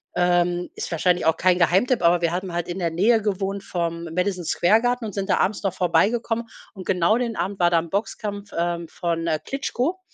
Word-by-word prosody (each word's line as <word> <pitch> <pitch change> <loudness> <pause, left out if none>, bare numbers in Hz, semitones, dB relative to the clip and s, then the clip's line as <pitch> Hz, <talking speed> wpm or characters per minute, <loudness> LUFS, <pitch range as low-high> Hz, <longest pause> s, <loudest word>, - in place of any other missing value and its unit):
ähm, 175 0 +1
ist - - -5
wahrscheinlich 175 +1 +1
auch 160 - +3
kein 185 -1 +3
Geheimtipp, 185 +6 +2
aber 170 +1 +4
wir 170 -1 +1
hatten 185 0 -3
halt 175 0 -2
in 175 - -4
der 170 -3 -1
Nähe 215 +8 +3
gewohnt 200 -1 -2
vom 170 -2 -3
Madison 180 0 -1
Square 185 +7 +3
Garten 245 0 0
und 210 - -6
sind 195 -1 -2
da - - +2
abends 195 +3 0
noch 195 -2 0
vorbeigekommen. 220 +7 +1 0.3
Und 190 -2 -9
genau 185 +4 +2
den 235 -2 -2
Abend 195 0 -3
war 175 -1 +3
da 170 - +4
'n 165 0 -6
Boxkampf, 205 +1 -4
ähm, 170 0 -1
von, 165 0 -3
äh, 160 -2 0
Klitschko, 275 +5 -2
180 Hz, 215 wpm, -23 LUFS, 170-205 Hz, 0.3 s, aber